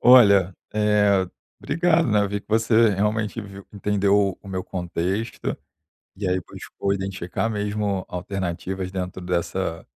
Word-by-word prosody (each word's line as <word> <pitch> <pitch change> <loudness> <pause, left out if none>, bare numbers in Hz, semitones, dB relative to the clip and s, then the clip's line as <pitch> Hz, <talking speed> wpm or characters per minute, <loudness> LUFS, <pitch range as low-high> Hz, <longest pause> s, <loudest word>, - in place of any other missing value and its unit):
Olha, 100 -7 +7 0.2
eh, 105 -2 +3 0.3
obrigado, 165 -1 +2
né, 105 0 +4
eu 100 - 0
vi 100 +1 -2
que - - -33
você 115 +1 +4
realmente 105 +3 0
viu 100 -2 -10
entendeu 100 -1 +2
o 100 - -11
meu 95 -1 -3
contexto, 90 +4 -3 0.6
e 100 - -3
aí 90 0 +1
buscou 100 - -3
identificar 95 +1 -2
mesmo 105 -2 -1
alternativas 95 0 -3
dentro 95 -1 -4
dessa 90 -1 -2
100 Hz, 130 wpm, -24 LUFS, 95-105 Hz, 0.6 s, Olha